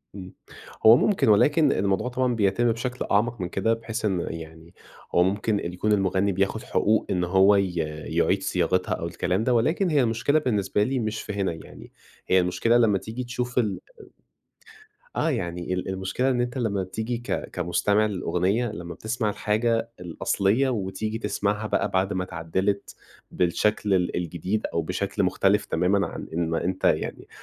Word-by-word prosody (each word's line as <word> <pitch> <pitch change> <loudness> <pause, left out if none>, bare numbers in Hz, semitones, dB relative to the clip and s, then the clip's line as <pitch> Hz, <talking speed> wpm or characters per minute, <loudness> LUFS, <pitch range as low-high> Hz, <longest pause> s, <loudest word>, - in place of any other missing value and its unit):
امم 95 -2 -9 0.5
هو 110 +2 +9
ممكن 195 - +2
ولكن 145 +8 +4
الموضوع 100 +4 0
طبعًا 125 -1 0
بيتم 110 +3 +2
بشكل 125 +2 -3
أعمق 115 +2 +1
من 90 - -3
كده، 100 +5 +1
بحيث 115 0 -4
إن 95 -4 +1
يعني 80 +1 -9 0.4
هو 90 - +6
ممكن 105 +3 0
يكون 105 +4 -1
المغني 95 -1 +2
بياخد 100 +3 -1
حقوق 110 +1 +1
إن 90 -2 0
هو 95 +3 +5
ي 95 -2 +1 0.3
يعيد 85 +4 +1
صياغتها 90 +1 0
أو - - -3
الكلام 95 +4 -1
ده، 125 - +2
ولكن 155 - +2
هي 150 -3 +3
المشكلة 115 +6 +1
بالنسبة 105 -7 0
لي 130 +4 -1
مش 110 -2 -2
في 105 - -6
هنا 100 -3 -1
يعني، 80 - -12 0.4
هي 95 - +4
المشكلة 95 +6 +2
لمّا 110 -4 +3
تيجي 110 +6 -6
تشوف 125 0 -4
ال 110 -5 +1 1.4
آه 165 - +1
يعني 90 - -3
ال 90 - -3
المشكلة 95 +7 -1
إن 125 -2 +1
أنت 120 +2 -2
لمّا 100 -6 -1
تيجي 110 +6 -4
ك 120 - -4
كمستمع 100 +4 +1
للأغنية 95 +4 0
لمّا 85 -4 -7
بتسمع 110 +3 -2
الحاجة 115 +3 0
الأصليّة، 100 +8 0
وتيجي 110 -1 -3
تسمعها 105 0 -1
بقى 105 - 0
بعد 95 +1 +1
ما 95 -1 -1
اتعدلت 95 +4 -2 0.3
بالشكل 100 +3 +1
ال 90 -1 0
الجديد، 90 +5 -2
أو 85 - 0
بشكل 80 - -2
مختلف - - +2
تمامًا 95 +4 +1
عن - - -7
إن 85 0 -1
ما 80 - -1
أنت 95 +1 -3
يعني - - 0
100 Hz, 165 wpm, -25 LUFS, 95-115 Hz, 1.4 s, هو